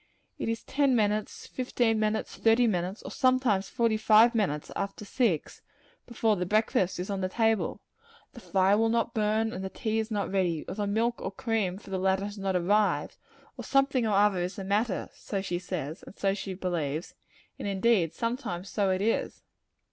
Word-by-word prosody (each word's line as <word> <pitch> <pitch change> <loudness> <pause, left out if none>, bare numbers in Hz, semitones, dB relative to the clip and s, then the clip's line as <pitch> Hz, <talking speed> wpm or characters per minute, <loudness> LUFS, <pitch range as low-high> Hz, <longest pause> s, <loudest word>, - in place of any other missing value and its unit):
It - - -2
is 230 0 -3
ten 275 -2 +2
minutes, 210 -1 0
fifteen 240 -3 0
minutes, 215 0 -1
thirty 230 +2 +4
minutes, 185 -1 -1
and - - -7
sometimes 255 -7 +2
forty 230 -3 +1
five 220 +2 +6
minutes 185 -10 -1
after 200 +1 -4
six, 200 - -1 0.5
before 225 -2 +1
the 180 - -2
breakfast 210 -3 +1
is 180 +3 -4
on 195 -1 -2
the 185 - -1
table. 225 0 0 0.5
The 240 - -10
fire 195 -1 +2
will 225 0 +3
not 230 0 0
burn, 220 +1 +1
and 185 - -5
the 190 - -3
tea 220 +3 -2
is 220 0 -2
not 205 -4 -2
ready; 180 -5 0
or - - -4
the 205 0 -2
milk 230 +4 0
or - - -2
cream 200 -4 -1
for 195 - -13
the 190 - -1
latter 190 +1 +1
has 205 0 -7
not 195 -1 -1
arrived; 205 +4 +1 0.4
or - - -6
something 275 -3 +2
or 210 - +1
other 200 -2 +4
is 180 +2 -2
the 200 - -6
matter 200 +1 0
so 200 - -4
she 180 -2 -2
says, 175 -3 -5
and - - -14
so 195 -1 +1
she 195 -1 -5
believes 170 -4 -3 0.5
and - - -4
indeed 195 -4 +2
sometimes 230 -6 -3
so 200 -2 0
it 185 +1 0
is. 225 - -1
205 Hz, 195 wpm, -28 LUFS, 190-225 Hz, 0.5 s, five